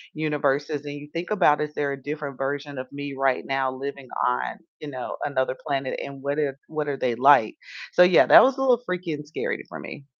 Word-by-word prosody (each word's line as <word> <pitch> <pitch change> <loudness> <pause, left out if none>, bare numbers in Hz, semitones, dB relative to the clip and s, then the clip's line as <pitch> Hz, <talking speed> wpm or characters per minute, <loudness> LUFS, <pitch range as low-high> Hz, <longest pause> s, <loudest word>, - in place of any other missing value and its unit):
universes 145 -1 -1
and 145 0 -6
you 145 0 -9
think 170 +1 -4
about 180 -9 +3
is 150 0 -2
there 145 -1 -1
a 135 -1 -6
different 145 -1 -6
version 140 0 -3
of 130 0 -8
me 145 0 -6
right 135 -1 +1
now 135 -1 0
living 135 0 -6 0.2
on, 60 0 -1 0.2
you 150 - -8
know, 130 -3 -5
another 130 -2 -1
planet, 135 -2 -2
and 140 -1 -9
what 140 +2 -1
if 140 -3 0
what 155 -1 -3
are 140 - -2
they 125 -2 0
like? 130 -3 +5 0.4
So - - +5
yeah, 180 -1 +7
that - - +9
was 265 0 +3
a - - -2
little 250 -3 +3
freaky 180 -5 -3
and 150 0 -7
scary 155 - -3
for - - -8
me. 140 - -9
145 Hz, 225 wpm, -24 LUFS, 135-150 Hz, 0.4 s, that